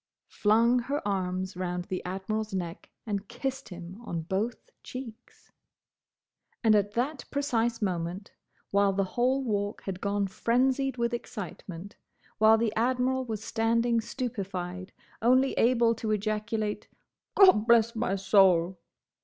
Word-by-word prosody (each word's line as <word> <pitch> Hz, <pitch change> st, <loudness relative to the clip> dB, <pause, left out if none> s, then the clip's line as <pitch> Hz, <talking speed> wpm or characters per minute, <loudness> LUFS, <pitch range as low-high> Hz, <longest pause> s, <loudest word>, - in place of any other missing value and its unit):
flung 230 Hz, +4 st, +3 dB
her 270 Hz, -1 st, -3 dB
arms 185 Hz, -1 st, -2 dB
round 180 Hz, -1 st, -3 dB
the 185 Hz, -2 st, -4 dB
Admiral's 195 Hz, +3 st, -3 dB
neck 175 Hz, -2 st, -5 dB, 0.2 s
and 205 Hz, -2 st, -3 dB
kissed 265 Hz, +3 st, -4 dB
him 180 Hz, +3 st, -9 dB
on 170 Hz, -7 st, -4 dB
both 200 Hz, +7 st, -3 dB
cheeks. 250 Hz, -4 st, -10 dB, 1.1 s
And 220 Hz, -2 st, +5 dB
at 205 Hz, -1 st, +2 dB
that 265 Hz, +5 st, -2 dB
precise 240 Hz, -6 st, 0 dB
moment, 180 Hz, +1 st, -3 dB, 0.4 s
while 200 Hz, 0 st, +3 dB
the 195 Hz, +1 st, +1 dB
whole 250 Hz, +7 st, 0 dB
Walk 205 Hz, -3 st, -2 dB
had 190 Hz, -2 st, -5 dB
gone 200 Hz, 0 st, 0 dB
frenzied 255 Hz, +6 st, +1 dB
with 235 Hz, 0 st, 0 dB
excitement, 200 Hz, -5 st, -7 dB, 0.4 s
while 220 Hz, +1 st, +6 dB
the 220 Hz, -1 st, 0 dB
Admiral 255 Hz, +2 st, +1 dB
was 220 Hz, -3 st, -5 dB
standing 230 Hz, +1 st, +1 dB
stupefied, 195 Hz, -7 st, -5 dB, 0.3 s
only 255 Hz, +3 st, +4 dB
able 235 Hz, -1 st, +3 dB
to 225 Hz, -1 st, -4 dB
ejaculate 215 Hz, 0 st, -2 dB, 0.5 s
"Gobblessmysoul!" 200 Hz, -, +4 dB
215 Hz, 120 wpm, -28 LUFS, 190-240 Hz, 1.1 s, while